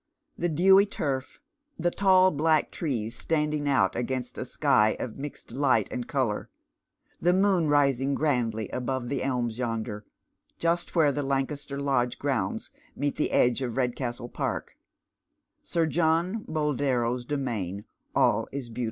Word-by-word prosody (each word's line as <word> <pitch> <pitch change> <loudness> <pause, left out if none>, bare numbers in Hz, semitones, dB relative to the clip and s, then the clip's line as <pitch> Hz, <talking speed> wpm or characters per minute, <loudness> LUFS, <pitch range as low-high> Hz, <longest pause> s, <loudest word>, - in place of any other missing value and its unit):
Tiie 170 -2 0
dewy 190 +4 +6
turf, 135 -8 -3 0.4
the 175 - 0
tail 185 -1 +5
black 155 0 +2
trees 115 -9 -3
standing 150 -2 0
out 95 -9 +2
against 125 +1 -3
a - - -3
sky 105 0 +2
of 120 +1 -5
mixed 145 +1 -7
light 130 -6 +2
and 120 -1 -4
colour, 130 -7 -1 0.7
tlio 180 +2 +3
moon 190 -5 +3
rising 140 -2 +2
grandly 115 -8 0
above 125 -1 -3
the 140 - -1
elms 125 -3 -1
yonder, 110 -3 -3 0.5
just 170 +2 -1
where 155 -4 +5
the 145 - -2
Lancaster 140 +1 -2
Lodge 130 -4 0
grounds 130 -9 -2 0.2
meet 145 0 -1
the - - +1
eilgo 125 +1 +2
of 120 - -5
liedcaatlo 120 -2 -2
i'ark, - - -2 0.9
Sir 165 -1 0
John 170 +6 +1
Boldero's 130 -5 0
domain 115 -8 -3
— - - -41
all - - +3
if 130 -4 -6
be«u!. 120 - -7
135 Hz, 145 wpm, -27 LUFS, 120-155 Hz, 0.9 s, dewy